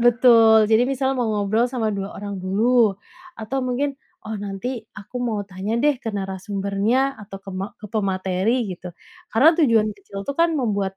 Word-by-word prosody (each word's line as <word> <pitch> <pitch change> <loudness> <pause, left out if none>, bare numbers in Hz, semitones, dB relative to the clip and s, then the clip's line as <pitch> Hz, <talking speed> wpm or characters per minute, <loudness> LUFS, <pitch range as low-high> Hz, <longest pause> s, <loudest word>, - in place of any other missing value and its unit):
Betul. 230 -2 +6
Jadi 220 +2 +5
misal 270 0 0
mau 245 -4 -1
ngobrol 215 +3 +1
sama 230 -4 -1
2 195 0 -3
orang 200 -2 -6
dulu, 215 +2 +2 0.4
atau 225 +5 -4
mungkin, 260 +3 -1 0.3
"Oh 220 - -6
nanti 200 +3 -4 0.3
aku 210 +4 -9
mau 220 -4 -2
tanya 195 +3 -4
deh, 290 +4 +3
ke 230 - -5
narasumbernya 200 +6 -1
atau 200 -1 -9
ke 195 - -8
ma 190 +1 -3
ke 210 - -10
pemateri," 195 +2 0
gitu, 180 0 -8 0.4
karena 265 +8 +6
tujuan 230 -7 +4
kecil 200 0 -10
itu 280 - -3
kan 335 - +5
membuat 200 -6 -1
215 Hz, 170 wpm, -22 LUFS, 195-245 Hz, 0.4 s, Betul